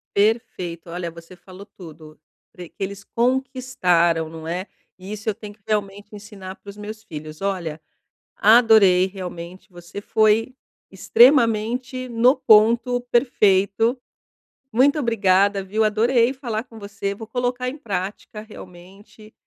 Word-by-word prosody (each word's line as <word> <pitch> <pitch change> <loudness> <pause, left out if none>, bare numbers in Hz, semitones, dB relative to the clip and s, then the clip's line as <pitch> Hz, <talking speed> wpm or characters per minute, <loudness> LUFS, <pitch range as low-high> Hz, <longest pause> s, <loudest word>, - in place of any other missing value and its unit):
Perfeito, 185 -6 -1
olha, 170 0 -5
você 170 +2 -14
falou 185 +2 -14
tudo. 155 -6 -14 0.3
Pre 180 -1 -10
que - - -42
eles 200 +1 -6
conquistaram, 235 -11 0
não 160 0 -10
é? 180 +4 -4 0.3
E 190 +3 -9
isso 215 +1 -4
eu - - 0
tenho 210 -1 -10
que 205 - -29
realmente 205 -1 -3
ensinar 200 -2 -10
para 200 - -15
os 200 - -10
meus 215 +1 -8
filhos. 155 -1 -9
Olha, 175 -6 -3 0.6
adorei, 215 -5 +5
realmente, 180 -1 -9
você 175 +2 -10
foi 220 +4 +2 0.4
extremamente 245 0 +2
no 245 +4 +3
ponto 235 +2 +4
perfeito. 225 -1 +2 0.7
Muito 275 +6 +3
obrigada, 200 -5 +2
viu, 210 +4 -1
adorei 230 +3 +2
falar 235 -5 -4
com 225 -3 -14
você, 200 -1 -5
vou 220 +2 -10
colocar 245 +1 -2
em 275 - -8
prática 205 -2 -5
realmente. 200 +1 -15
205 Hz, 135 wpm, -22 LUFS, 185-230 Hz, 0.7 s, adorei